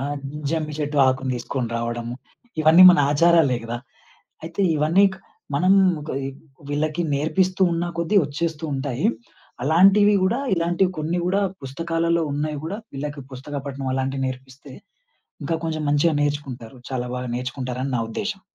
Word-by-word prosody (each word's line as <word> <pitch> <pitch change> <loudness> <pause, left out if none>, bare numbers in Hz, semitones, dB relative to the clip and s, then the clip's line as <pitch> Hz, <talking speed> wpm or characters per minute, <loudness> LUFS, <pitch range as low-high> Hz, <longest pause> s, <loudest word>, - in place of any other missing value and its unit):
ఆ! - - -3 0.5
జమ్మి 155 -2 -2
చెట్టు 150 0 -2
ఆకుని 130 0 0
తీసుకొని 120 0 -3
రావడము, 120 0 -3 0.5
ఇవన్నీ 160 +4 +7
మన 175 - +4
ఆచారాలే 165 -4 +4
గదా! 120 +1 -4 0.7
అయితే 165 +4 -5 0.2
ఇవన్నీ 165 +7 +4
క్ - - -15 0.4
మనం 185 +6 +3 0.4
కోయి 135 0 -3 0.4
వీళ్ళకి 155 +3 -1
నేర్పిస్తూ 185 +6 +1
ఉన్న 170 +1 -1
కొద్దీ 195 +5 +3
ఒచ్చేస్తూంటాయి. 150 -3 -2 0.6
అలాంటివి 195 +6 +5
గూడా, 235 +8 +1
ఇలాంటివి 175 +2 +1
కొన్ని 165 +3 -1
గూడా, 195 +2 +1 0.2
పుస్తకాలలో 165 +4 -1
ఉన్నాయి 150 0 -2
గూడా, 200 +6 -4 0.2
వీళ్ళకి 145 0 -5
పుస్తక 140 +3 -7
పఠనం 135 -1 -4
అలాంటివి 135 0 -1
నేర్పిస్తే, 130 +1 -10 0.7
ఇంకా 165 -1 -1
కొంచెం 155 -1 -2
మంచిగా 145 +2 +2
నేర్చుకుంటారు. 135 -5 -4
చాలా 125 -1 -2
బాగా 125 -1 -4
నేర్చుకుంటారని 130 +1 -4
నా - - 0
ఉద్దేశ్యం. 200 - -4
150 Hz, 135 wpm, -23 LUFS, 130-170 Hz, 0.7 s, ఇవన్నీ